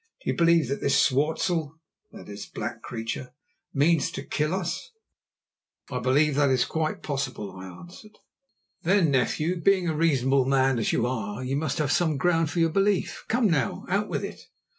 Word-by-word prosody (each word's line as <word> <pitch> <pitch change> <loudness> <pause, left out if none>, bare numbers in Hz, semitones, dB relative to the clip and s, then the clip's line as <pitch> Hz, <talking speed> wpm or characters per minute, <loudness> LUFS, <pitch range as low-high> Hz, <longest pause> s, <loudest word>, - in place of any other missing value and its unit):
"Do - - +1
you - - -3
believe 170 -3 +4
that 140 - -2
this 140 0 +2
swartzel" 155 +3 +1 0.3
(that - - -12
is, 100 0 -8
black - - -5
creature) 120 +2 -5 0.4
"means 150 +1 +2
to - - -5
kill 150 +1 -1
us?" 185 - -3 1.0
"I 125 - -2
believe 140 +5 +3
that 140 0 +3
it - - +3
is 125 -1 +2
quite 160 -1 -2
possible," 135 -8 -3
I 95 0 -8
answered. 175 - -13 0.6
"Then, 175 -3 +3
nephew, 155 +6 0
being 190 0 +3
a 160 - 0
reasonable 135 -4 +2
man 135 -2 +2
as 110 - 0
you - - +1
are, 115 -2 -3
you 130 +2 -2
must 145 -1 -1
have 150 -2 0
some 160 -3 +2
ground 165 0 +2
for 175 - -6
your 165 -1 +3
belief. 195 +1 0
Come 240 +1 +1
now, 145 - 0
out 205 +3 0
with - - -2
it." - - -9
150 Hz, 185 wpm, -26 LUFS, 130-170 Hz, 1.0 s, believe